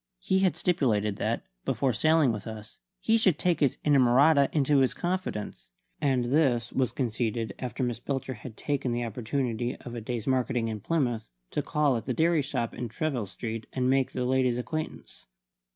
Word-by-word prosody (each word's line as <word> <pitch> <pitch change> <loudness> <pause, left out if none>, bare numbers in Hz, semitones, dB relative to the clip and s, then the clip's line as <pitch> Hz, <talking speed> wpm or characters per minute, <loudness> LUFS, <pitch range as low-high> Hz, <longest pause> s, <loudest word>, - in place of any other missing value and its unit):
He 190 - +1
had 190 -2 +2
stipulated 105 - +1
that, - - -1 0.2
before 135 -3 0
sailing 155 +2 +3
with 105 -1 -5
us, 110 -1 -9 0.2
he 225 +4 +3
should 190 -7 +3
take 175 -2 +1
his 140 -4 +2
inamorata 140 +1 +5
into 145 -1 +3
his 130 -1 +2
confidence; 180 - -3 0.3
and 130 -4 +2
this 125 -4 +2
was 130 -3 +1
conceded 115 -3 -2
after 130 +1 -3
Miss 120 -2 -1
Belcher 135 +1 -3
had 110 0 -10
taken 140 -4 -1
the 120 0 -1
opportunity 120 +1 -2
of 120 - -10
a 120 - -5
day's 115 -1 -4
marketing 125 -3 +1
in 110 -1 -4
Plymouth 120 -4 -1 0.2
to - - 0
call 145 -4 +1
at 115 - -7
the 130 - -1
dairy 165 -1 +3
shop 120 -4 -2
in 120 -1 -5
Treville 125 -2 -2
Street 110 +4 -6
and 130 0 +1
make 135 -1 +1
the 125 - -1
lady's 130 -1 +2
acquaintance. 155 +5 -6
125 Hz, 180 wpm, -28 LUFS, 115-145 Hz, 0.3 s, inamorata